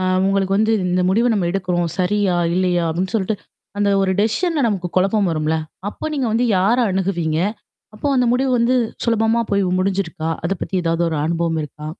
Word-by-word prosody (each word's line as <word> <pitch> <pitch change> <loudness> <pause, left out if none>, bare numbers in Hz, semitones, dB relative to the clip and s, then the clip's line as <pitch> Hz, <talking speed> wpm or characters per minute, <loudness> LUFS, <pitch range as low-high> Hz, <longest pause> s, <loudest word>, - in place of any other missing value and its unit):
அ - - -1 0.2
உங்களுக்கு 195 0 +1
வந்து 220 +1 +2 0.2
"இந்த 180 +1 +1
முடிவ 225 +6 +2
நம்ம 195 -5 0
எடுக்குறோம். 180 -2 -1
சரியா? 190 0 +1 0.2
இல்லையா?" 180 -1 +1
அப்படின்னு 180 +4 -2
சொல்லிட்டு 215 0 0 0.4
அந்த 205 0 +2
ஒரு 190 - +1
டெஷிஷன்ல 310 - 0
நமக்கு 190 -5 -1
குழப்பம் 195 +1 +2
வரும்ல? 155 0 0 0.3
அப்போ - - -8
நீங்க 270 -4 -1
வந்து 230 +3 +2
யார 200 +6 +3
அணுகுவீங்க? 175 -4 -1 0.6
அப்போ 215 - -5
அந்த 250 - +3
முடிவு 260 +2 +1
வந்து 235 +2 +2 0.3
சுலபமா 225 0 +2
போய் 200 0 +2 0.2
முடிஞ்சிருக்கா? 185 -4 -1
அத 165 - -1
பத்தி 190 - -3
ஏதாவது 165 +1 +1
ஒரு 160 - -2
அனுபவம் 165 -1 -1
இருக்கா? 150 +1 -10
190 Hz, 175 wpm, -20 LUFS, 175-220 Hz, 0.6 s, யார